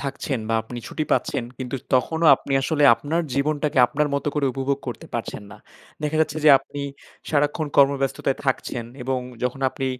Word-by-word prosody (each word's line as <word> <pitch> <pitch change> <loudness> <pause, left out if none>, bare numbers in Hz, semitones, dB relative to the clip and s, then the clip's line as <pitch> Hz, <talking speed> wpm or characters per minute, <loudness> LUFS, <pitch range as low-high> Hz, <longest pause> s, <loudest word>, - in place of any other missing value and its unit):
থাকছেন 135 -1 -3
বা 115 - +1
আপনি 120 +2 -8
ছুটি 155 - -3
পাচ্ছেন 120 - 0
কিন্তু 130 +1 -4 0.2
তখনও 160 +6 +2
আপনি 140 - -6
আসলে 150 +1 0
আপনার 160 +6 -2
জীবনটাকে 145 0 0
আপনার 150 +3 0
মতো 140 +1 -1
করে 145 -2 +1
উপভোগ 135 +1 -1
করতে 120 - -7
পারছেন 115 -2 -4
না। 105 - -11 0.5
দেখা 150 +1 -1
যাচ্ছে 155 0 0
যে - - +8
আপনি 140 +1 -9 0.5
সারাক্ষণ 145 +1 +1
কর্মব্যস্ততায় 135 -1 +2
থাকছেন 125 -2 -1 0.2
এবং 130 0 -1 0.2
যখন 125 +2 -2
আপনি 135 - -4
140 Hz, 170 wpm, -23 LUFS, 130-150 Hz, 0.5 s, যে